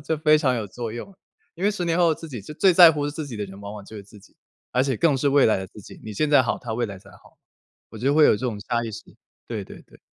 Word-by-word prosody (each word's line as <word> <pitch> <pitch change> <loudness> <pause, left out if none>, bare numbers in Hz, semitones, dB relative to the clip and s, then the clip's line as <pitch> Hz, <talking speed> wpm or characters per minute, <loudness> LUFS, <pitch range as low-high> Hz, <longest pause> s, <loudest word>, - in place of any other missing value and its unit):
这 160 - -1
非 155 0 +4
常 135 -5 +1
有 110 - -3
作 115 +3 -6
用， 120 - -8 0.4
因 180 - -4
为 205 - +4
10 185 -4 -3
年 170 0 0
后 170 -3 +3
自 165 - -10
己， 120 -6 -7
就 150 - -10
最 185 +4 +4
在 170 -2 +8
乎 145 -1 -2
自 150 +1 -6
己 125 -5 -7
的 105 - -3
人 95 +1 -12
往 100 0 -8
往 105 -2 -10
就 110 - -11
是 100 - -9
自 105 +1 -17
己， - - -23 0.4
而 125 - +2
且 130 -3 -1
更 150 0 +2
是 140 +2 +1
未 140 0 +4
来 110 - +3
的 95 - -6
自 105 - -14
己， - - -14
你 110 - -7
现 150 +9 -1
在 145 - +6
好， 120 - -1
他 115 - -6
未 120 +1 -1
来 100 -2 -8
才 - - -18
好。 - - -20 0.5
我 110 - -10
就 135 +5 +1
会 155 0 +6
有 - - +5
这 125 - -3
种 110 -4 -4
差 120 +1 -2
异 115 - -5
性， - - -11 0.3
对 - - -4
对 - - -13
对。 - - -21
130 Hz, 330 characters per minute, -23 LUFS, 110-155 Hz, 0.5 s, 在